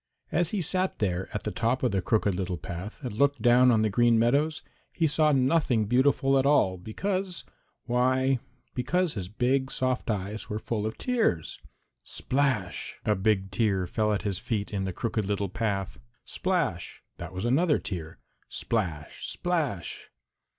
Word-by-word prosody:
As 175 0 +2
he 200 -4 -1
sat 185 +3 +2
there 95 -2 -1
at 105 - -4
the 105 - -2
top 120 +4 0
of 125 - +2
the 95 -1 0
Crooked 105 +1 +1
Little 90 -1 -2
Path 90 +6 -7
and 125 - -4
looked 140 +5 +2
down 125 +1 +5
on 110 -3 +4
the 110 - +2
Green 120 +2 +4
Meadows, 140 +7 +2 0.3
he 165 - 0
saw 155 0 +3
nothing 130 -4 +2
beautiful 135 +3 +3
at 135 - +1
all 95 -11 +3
because, 185 - -3 0.4
why, 130 +2 +2 0.3
because 170 +7 0
his 95 -5 -5
big 130 +5 +1
soft 130 -2 -1
eyes 105 +1 -3
were 105 - -2
full 110 -1 -2
of 110 - -6
tears. 225 - 0 0.4
Splash! 130 -10 -2
A 105 - +3
big 95 -1 0
tear 95 -3 +1
fell 105 +4 0
at 105 - -1
his 100 -3 -1
feet 105 -4 -3
in 95 -1 -1
the 95 - -3
Crooked 110 0 -2
Little 100 -1 -1
Path. 100 -3 -2 0.3
Splash! 165 - -2
That 85 0 -7
was 95 +4 -4
another 150 +5 +3
tear. 80 -5 -6 0.3
Splash! 85 -10 -3
splash! 150 - -3
115 Hz, 165 wpm, -27 LUFS, 100-135 Hz, 0.4 s, down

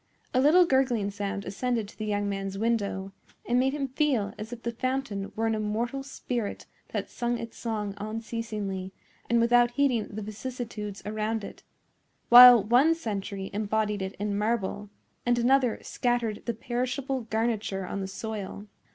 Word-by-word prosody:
A 255 - +4
little 335 +6 +6
gurgling 250 -8 +1
sound 200 0 -4
ascended 235 0 -1
to 210 - -14
the 215 - -5
young 205 -1 0
man's 195 -1 -3
window, 200 -3 -1 0.4
and 245 +1 +3
made 265 +1 +2
him 285 -2 -2
feel 255 -7 +1
as 215 +2 -8
if 240 -1 -8
the 235 - -1
fountain 245 -5 -2
were 225 - 0
an 225 - +1
immortal 220 +5 -2
spirit 245 -5 -4 0.2
that - - -3
sung 240 0 -1
its 230 -1 -7
song 210 -3 -3
unceasingly 215 -3 -4 0.4
and 235 - +4
without 240 +1 +5
heeding 245 -3 +1
the 215 +1 -6
vicissitudes 215 -2 -6
around 215 +1 -2
it, - - -9 0.7
while 245 -2 +11
one 255 +10 +4
century 200 -8 -4
imbodied 210 0 0
it 190 0 -4
in 205 0 -2
marble 210 -1 -1 0.3
and 240 0 +2
another 250 0 +3
scattered 240 -4 -1
the 235 - -1
perishable 255 +3 -2
garniture 220 -3 -1
on 195 +2 -4
the 190 - -3
soil. 205 0 -6
225 Hz, 160 wpm, -28 LUFS, 205-245 Hz, 0.7 s, while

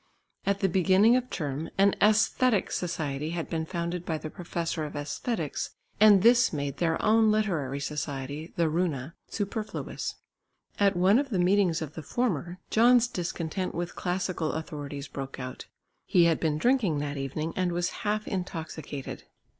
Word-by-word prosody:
At 200 0 +1
the 195 - +4
beginning 190 +5 +4
of 255 0 0
term 150 0 -3
an 195 +1 +5
Æsthetic 215 +1 +3
Society 155 -4 -2
had 165 - -4
been 160 -1 -2
founded 170 0 -3
by 160 -2 -2
the 155 0 -7
professor 170 -3 -3
of 150 - -5
Æsthetics, 150 - -3 0.2
and 205 -3 +7
this 245 +2 +6
made 140 -3 -3
their 165 -2 +1
own 220 0 +5
literary 165 -11 0
society, 145 +1 -4
the 170 -1 +2
"Runa," 160 -3 -1
superfluous. 210 +1 -4 0.6
At 200 -1 +4
one 190 +6 +5
of 280 -1 -2
the 205 - -1
meetings 180 -2 +3
of 155 -1 -8
the 160 - -6
former, 180 - -1
John's 240 +1 +5
discontent 175 -2 -3
with 175 0 -3
classical 180 -3 -1
authorities 145 -3 -5
broke 135 -1 -6
out. 130 0 -7 0.4
He 175 - +5
had 165 -1 +3
been 155 -2 0
drinking 225 - +2
that 145 0 -3
evening 145 +4 -3
and 185 -1 0
was 175 +1 0
half 210 0 -1
intoxicated. 160 -6 -5
175 Hz, 155 wpm, -28 LUFS, 155-200 Hz, 0.6 s, and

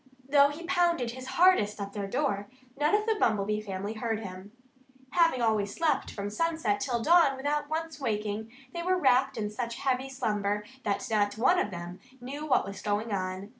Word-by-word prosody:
Though 280 0 +6
he 300 +4 -7
pounded 340 -8 +1
his 255 +1 -8
hardest 340 - +4
at 200 0 -5
their 200 -2 -3
door, 205 -4 -1 0.3
none 295 +7 +2
of 420 0 +1
the 445 -1 +1
Bumblebee 210 -1 +1
family 200 0 -4
heard 225 -1 -2
him. 190 0 -8 0.6
Having 330 -8 +3
always 210 -3 +1
slept 325 -2 +1
from 205 0 -5
sunset 320 -7 0
till 240 -4 -1
dawn 325 -4 +5
without 290 +2 -1
once 320 -1 -3
waking, 215 -2 -2 0.2
they 340 - -3
were 365 +2 +1
wrapped 265 -5 +3
in 210 -1 -2
such 235 +1 -4
heavy 265 0 -1
slumber 210 -5 -1 0.2
that 200 -2 -1
not 205 -1 +1
one 350 +11 +4
of - - 0
them 175 -1 -7 0.2
knew 280 +5 -6
what 280 - +3
was 195 -1 -7
going 210 +1 -1
on. 185 +1 -3
235 Hz, 185 wpm, -29 LUFS, 205-295 Hz, 0.6 s, Though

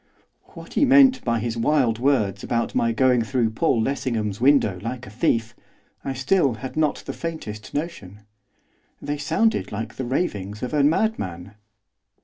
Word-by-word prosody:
What - - -11
he - - +2
meant 270 -1 +6
by 115 -1 0
his 115 +1 -3
wild 115 -2 +2
words 125 -7 +1
about 115 -1 -1
my 115 - +1
going 125 +1 +3
through 115 -1 0
Paul 120 +1 +1
Lessingham's 115 -6 -2
window 130 -9 +3
like 125 +3 -5
a 95 - -11
thief, 115 0 0 0.5
I 135 - -3
still 135 0 +1
had 130 +3 -7
not 155 -2 0
the - - -5
faintest 110 -11 -6
notion. 125 - -5 0.8
They 145 0 -4
sounded 165 +10 0
like 110 +2 -5
the 130 - -3
ravings 105 - -3
of 125 - -4
a 150 - +3
madman. 105 - 0
125 Hz, 155 wpm, -23 LUFS, 110-145 Hz, 0.8 s, meant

